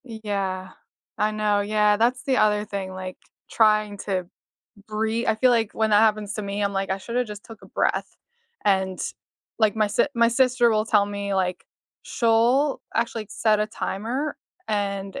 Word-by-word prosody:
Yeah, 200 Hz, -5 st, -4 dB, 0.5 s
I 210 Hz, +1 st, +1 dB
know, 210 Hz, -1 st, +1 dB
yeah, 210 Hz, 0 st, +2 dB
that's 245 Hz, +3 st, +1 dB
the 270 Hz, -3 st, +1 dB
other 210 Hz, 0 st, +3 dB
thing, 200 Hz, -2 st, -5 dB
like 185 Hz, 0 st, -7 dB, 0.3 s
trying 215 Hz, -2 st, +3 dB
to 190 Hz, -3 st, -2 dB, 0.6 s
brea 220 Hz, +2 st, -1 dB
I 220 Hz, -, +3 dB
feel 250 Hz, +4 st, +3 dB
like 225 Hz, -3 st, +1 dB
when 220 Hz, -1 st, 0 dB
that 210 Hz, 0 st, +6 dB
happens 215 Hz, -2 st, +1 dB
to 215 Hz, -, -4 dB
me, 200 Hz, +1 st, -3 dB
I'm 200 Hz, 0 st, 0 dB
like 195 Hz, 0 st, -2 dB
I 190 Hz, -, 0 dB
shoulda 240 Hz, +5 st, -2 dB
just 210 Hz, -2 st, -9 dB
took 225 Hz, -2 st, -13 dB
a -, -, -12 dB
breath -, -, -1 dB, 0.5 s
and, 190 Hz, -2 st, +1 dB, 0.6 s
like, 220 Hz, -2 st, +3 dB
my 215 Hz, -1 st, +3 dB
s 205 Hz, -, -6 dB, 0.2 s
my 235 Hz, -1 st, +4 dB
sister 245 Hz, 0 st, +3 dB
will 215 Hz, -1 st, +2 dB
tell 210 Hz, -3 st, +4 dB
me, 200 Hz, -1 st, -3 dB
like, 185 Hz, -1 st, -1 dB, 0.4 s
she'll 240 Hz, +5 st, +2 dB
actually 230 Hz, -2 st, -1 dB
set 215 Hz, -2 st, +2 dB
a 210 Hz, -, +1 dB
timer 235 Hz, +8 st, -3 dB, 0.3 s
and 200 Hz, +2 st, -2 dB
215 Hz, 175 wpm, -24 LUFS, 200-230 Hz, 0.6 s, that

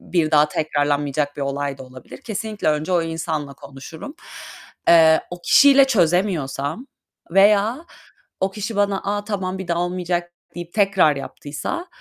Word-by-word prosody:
bir 165 Hz, -3 st, -1 dB
daha 150 Hz, 0 st, +4 dB
tekrarlanmayacak 145 Hz, -1 st, -1 dB
bir 140 Hz, -, -4 dB
olay 140 Hz, 0 st, -3 dB
da -, -, -8 dB
olabilir. 130 Hz, -1 st, -13 dB
Kesinlikle 215 Hz, -4 st, -3 dB
önce 155 Hz, +4 st, -1 dB
o 170 Hz, -2 st, +2 dB
insanla 160 Hz, -3 st, -4 dB
konuşurum. 140 Hz, -, -11 dB, 0.7 s
Eee, 160 Hz, -1 st, +6 dB
o 175 Hz, 0 st, -8 dB
kişiyle 280 Hz, +4 st, +6 dB
çözemiyorsam 175 Hz, -, 0 dB, 0.4 s
veya 210 Hz, -, +3 dB, 0.6 s
o 190 Hz, -, 0 dB
kişi 210 Hz, +2 st, -5 dB
bana 200 Hz, -1 st, +1 dB
"A, 205 Hz, 0 st, -2 dB
tamam, 190 Hz, -3 st, -3 dB
bir 190 Hz, -2 st, -7 dB
daha 170 Hz, 0 st, 0 dB
olmayacak." 175 Hz, -1 st, -2 dB, 0.2 s
deyip 175 Hz, 0 st, -8 dB
tekrar 195 Hz, -8 st, +3 dB
yaptıysa, 150 Hz, -, -6 dB
175 Hz, 140 wpm, -21 LUFS, 150-200 Hz, 0.7 s, Eee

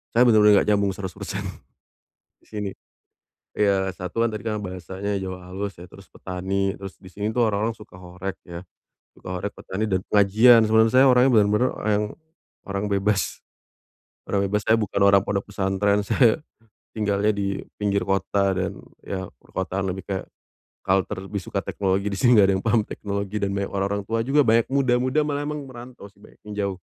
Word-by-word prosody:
saya 120 Hz, -, +6 dB
bener-bener 110 Hz, -3 st, +6 dB
enggak -, -, +3 dB
nyambung 100 Hz, -1 st, +2 dB
100%, 95 Hz, -3 st, -5 dB, 1.0 s
di -, -, -29 dB
sini. 105 Hz, -2 st, -4 dB, 0.8 s
Iya 95 Hz, -2 st, +1 dB
satu 95 Hz, +6 st, -1 dB
kan -, -, 0 dB
tadi 105 Hz, -, -5 dB
karena 110 Hz, -2 st, -2 dB
bahasanya 95 Hz, +1 st, -5 dB
Jawa 95 Hz, -1 st, -5 dB
halus 100 Hz, -1 st, -5 dB
ya, 90 Hz, -, -10 dB
terus -, -, -16 dB
petani, 95 Hz, +1 st, -2 dB
terus 95 Hz, -1 st, -9 dB
di 95 Hz, -, -17 dB
sini 105 Hz, +3 st, -4 dB
tuh 120 Hz, 0 st, +2 dB
orang-orang 110 Hz, +2 st, 0 dB
suka 105 Hz, -, -15 dB
horeg 90 Hz, +1 st, -7 dB
ya, 85 Hz, 0 st, -9 dB, 0.5 s
suka 90 Hz, 0 st, -7 dB
horeg, 100 Hz, +3 st, -4 dB
petani 100 Hz, +3 st, -4 dB
dan 95 Hz, -4 st, 0 dB
pengajian. 110 Hz, +4 st, +6 dB
Sedangkan 110 Hz, +1 st, +4 dB
saya 130 Hz, +1 st, +6 dB
orangnya 125 Hz, +1 st, +5 dB
bener-bener 105 Hz, +5 st, +2 dB
orang- 105 Hz, 0 st, 0 dB, 0.6 s
orang 100 Hz, +1 st, -2 dB
bebas. 100 Hz, 0 st, 0 dB, 0.9 s
Orang 100 Hz, 0 st, +1 dB
bebas 105 Hz, +2 st, 0 dB
saya 110 Hz, +1 st, +5 dB
bukan 105 Hz, -2 st, -2 dB
orang 100 Hz, -1 st, +6 dB
pondok 100 Hz, 0 st, -2 dB
pesantren. 100 Hz, +1 st, 0 dB
Saya 120 Hz, +4 st, +3 dB, 0.6 s
tinggalnya 105 Hz, -1 st, +1 dB
di 100 Hz, -1 st, -2 dB, 0.2 s
pinggir 100 Hz, -1 st, 0 dB
kota 95 Hz, 0 st, +1 dB
dan 95 Hz, +1 st, -3 dB, 0.2 s
ya 95 Hz, -1 st, -5 dB
perkotaan 95 Hz, +4 st, -3 dB
lebih 95 Hz, +1 st, -6 dB
kayak 95 Hz, -1 st, -4 dB, 0.6 s
culture, 95 Hz, +1 st, 0 dB
lebih 100 Hz, 0 st, -4 dB
suka -, -, -4 dB
teknologi 95 Hz, 0 st, -1 dB
di -, -, -2 dB
sini 120 Hz, -2 st, +5 dB
enggak 100 Hz, -, +7 dB
ada -, -, +1 dB
yang -, -, -15 dB
paham 115 Hz, 0 st, +3 dB
teknologi 100 Hz, 0 st, -4 dB
dan 100 Hz, -1 st, 0 dB
banyak 100 Hz, 0 st, -2 dB
orang-orang 100 Hz, +1 st, -1 dB
tua 115 Hz, +1 st, -1 dB
juga 135 Hz, +5 st, +2 dB
banyak 115 Hz, +1 st, +4 dB
muda-muda 130 Hz, +1 st, +2 dB
malah 145 Hz, -1 st, -2 dB
emang 150 Hz, -1 st, -4 dB
merantau 125 Hz, -3 st, -11 dB
sih 100 Hz, -, -27 dB
banyak -, -, -18 dB
yang 105 Hz, -, -7 dB
jauh. 100 Hz, -2 st, -1 dB
100 Hz, 180 wpm, -24 LUFS, 95-110 Hz, 1.0 s, enggak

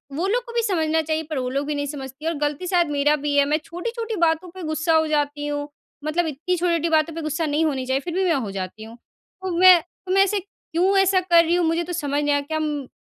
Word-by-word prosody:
वो 345 Hz, +6 st, -1 dB
लोग 475 Hz, +5 st, 0 dB
को 470 Hz, -, -10 dB
भी 470 Hz, -, +1 dB
समझना 320 Hz, -6 st, +1 dB
चाहिए, 315 Hz, 0 st, -2 dB
पर 310 Hz, -1 st, -5 dB
वो 255 Hz, -1 st, -2 dB
लोग 275 Hz, +2 st, -2 dB
भी 300 Hz, -, -1 dB
नहीं 285 Hz, 0 st, -2 dB
समझती 275 Hz, 0 st, -8 dB
हैं 330 Hz, -, +1 dB
और 330 Hz, -, -4 dB
गलती 295 Hz, +4 st, -2 dB
शायद 350 Hz, -2 st, +2 dB
मेरा 290 Hz, +1 st, +3 dB
भी 290 Hz, 0 st, -2 dB
है, 285 Hz, -, +5 dB
मैं 300 Hz, +2 st, +1 dB
छोटी-छोटी 455 Hz, +7 st, -5 dB
बातों 325 Hz, +2 st, +1 dB
पे 375 Hz, -, -7 dB
गुस्सा 315 Hz, +1 st, 0 dB
हो 315 Hz, 0 st, +3 dB
जाती 290 Hz, -1 st, -1 dB
हूँ। 290 Hz, 0 st, -3 dB, 0.4 s
मतलब 325 Hz, +2 st, 0 dB
इतनी 320 Hz, +5 st, -2 dB
छोटी-छोटी 335 Hz, -1 st, 0 dB
बातों 320 Hz, 0 st, +2 dB
पे 330 Hz, -, -4 dB
गुस्सा 310 Hz, +1 st, -2 dB
नहीं 305 Hz, +2 st, +1 dB
होनी 270 Hz, -4 st, -1 dB
चाहिए, 260 Hz, +1 st, 0 dB
फिर 340 Hz, +3 st, -5 dB
भी 380 Hz, +2 st, +1 dB
मैं 345 Hz, -, +3 dB
हो 235 Hz, -9 st, -2 dB
जाती 195 Hz, +2 st, -6 dB
हूँ। 225 Hz, +2 st, -11 dB
तो 375 Hz, +9 st, -10 dB
मैं 365 Hz, 0 st, +8 dB
तो 365 Hz, +2 st, -11 dB
मैं 390 Hz, +1 st, +5 dB
ऐसे 400 Hz, +1 st, 0 dB
क्यों 380 Hz, 0 st, -1 dB
ऐसा 385 Hz, -1 st, +4 dB
कर 345 Hz, -2 st, +5 dB
रही 335 Hz, +2 st, +2 dB
हूँ? 355 Hz, -1 st, +2 dB
मुझे 330 Hz, +1 st, +1 dB
तो 355 Hz, +1 st, -6 dB
समझ 290 Hz, -3 st, -1 dB
नहीं 290 Hz, 0 st, +2 dB
आ -, -, +3 dB
रहा। -, -, -1 dB
क्या 315 Hz, 0 st, -2 dB
अम, 300 Hz, -3 st, -2 dB
320 Hz, 275 wpm, -23 LUFS, 290-355 Hz, 0.4 s, मैं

